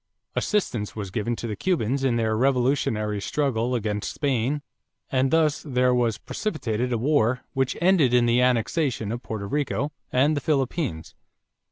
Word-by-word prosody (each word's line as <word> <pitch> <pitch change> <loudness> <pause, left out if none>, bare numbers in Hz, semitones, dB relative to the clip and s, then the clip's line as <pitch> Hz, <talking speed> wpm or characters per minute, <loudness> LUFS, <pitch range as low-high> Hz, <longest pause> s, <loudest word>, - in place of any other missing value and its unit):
Assistance 120 - -1
was 100 -3 -5
given 115 +3 -1
to 120 - -6
the 110 -2 -3
Cubans 135 - 0
in 130 -3 +2
their 110 -2 +1
revolutionary 120 -5 +1
struggle 125 -2 0
against 105 -3 -2
Spain 140 0 -1 0.5
and 130 0 +2
thus 155 0 +2
there 125 -3 +1
was 120 -3 +1
precipitated 125 - -3
a 120 - +1
war 125 -1 +2
which 135 -2 0
ended 170 -7 +4
in 120 -1 +4
the 120 +1 +3
annexation 125 -1 +1
of 120 +1 -4
Porto 110 -4 -5
Rico 140 +2 -1 0.2
and 145 +5 +3
the 145 - -1
Philippines. 135 - -1
125 Hz, 155 wpm, -25 LUFS, 110-145 Hz, 0.5 s, ended